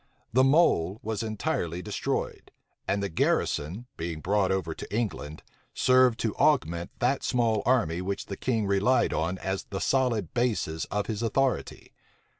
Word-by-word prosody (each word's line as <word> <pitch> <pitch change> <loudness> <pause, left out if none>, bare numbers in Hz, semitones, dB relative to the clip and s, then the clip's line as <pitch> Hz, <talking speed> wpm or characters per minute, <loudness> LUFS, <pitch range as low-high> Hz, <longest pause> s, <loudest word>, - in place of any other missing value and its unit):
The 130 +2 +5
mole 130 - +3
was 110 -2 -2
entirely 110 - -2
destroyed; - - -3 0.4
and 100 0 0
the - - 0
garrison, 85 +3 0
being 80 -1 -4
brought 100 +3 +1
over 90 -4 -1
to - - -9
England, 100 -9 -3 0.3
served 130 -2 +4
to 110 -3 -1
augment 85 - +2
that 130 +3 +1
small 115 -4 +1
army 90 -10 +2
which 100 +2 -3
the 100 - -5
king 115 -1 -1
relied 100 +6 +2
on 85 +4 -1
as 95 +1 -3
the 95 - -5
solid 120 - 0
basis 110 -10 0
of 105 0 -2
his 110 -1 -3
authority. 130 +3 -1
105 Hz, 150 wpm, -27 LUFS, 90-125 Hz, 0.4 s, The